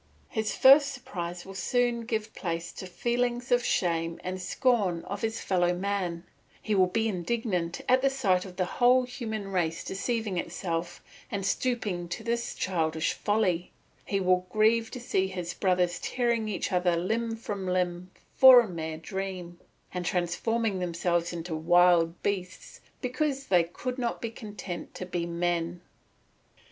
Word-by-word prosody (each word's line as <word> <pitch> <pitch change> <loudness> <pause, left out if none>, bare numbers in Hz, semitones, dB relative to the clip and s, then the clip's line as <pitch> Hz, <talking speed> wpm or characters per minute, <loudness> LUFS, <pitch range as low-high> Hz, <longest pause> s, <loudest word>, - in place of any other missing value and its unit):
His 220 -2 -2
first 280 +1 +7
surprise 175 -9 -6
will 195 - -9
soon 235 +4 0
give 220 -2 -2
place 170 -1 -4
to 185 - -7
feelings 240 +5 -1
of 245 0 +4
shame 165 -4 0
and 185 0 -4
scorn 195 -5 +1
of 200 +1 -5
his 225 0 -2
fellow 175 -2 +1
man; 180 -3 -2 0.4
he 215 - -2
will 190 -2 +4
be 225 +4 0
indignant 185 -3 -2
at 255 +1 +4
the 275 - +4
sight 200 -10 +1
of 185 -2 -10
the 185 0 0
whole 250 +6 +4
human 220 -5 -5
race 170 -3 -1
deceiving 210 -1 -2
itself 170 0 -4 0.3
and 195 -2 -3
stooping 205 -6 -1
to 220 - -5
this 235 +1 -2
childish 160 -3 0
folly; 190 -5 0 0.3
he 195 - -1
will 185 -1 +2
grieve 225 +2 +3
to 250 - -7
see 190 -5 0
his 180 -2 -5
brothers 180 -2 +1
tearing 235 -3 0
each 195 -4 -2
other 180 -1 +2
limb 225 +6 -1
from 205 -4 -5
limb 180 0 -1 0.3
for 260 -1 +10
a 235 - -4
mere 160 -3 -5
dream, 180 0 -5 0.3
and 180 -1 -2
transforming 190 +5 0
themselves 175 -1 0
into 170 -1 -5
wild 175 +1 +4
beasts 185 -2 -4 0.2
because 275 +1 -1
they 180 -3 +4
could 250 +10 -5
not 240 -1 -1
be 230 - -4
content 205 -7 -7
to 185 - -5
be 175 -1 -3
men. 170 0 -1
190 Hz, 155 wpm, -28 LUFS, 175-230 Hz, 0.4 s, for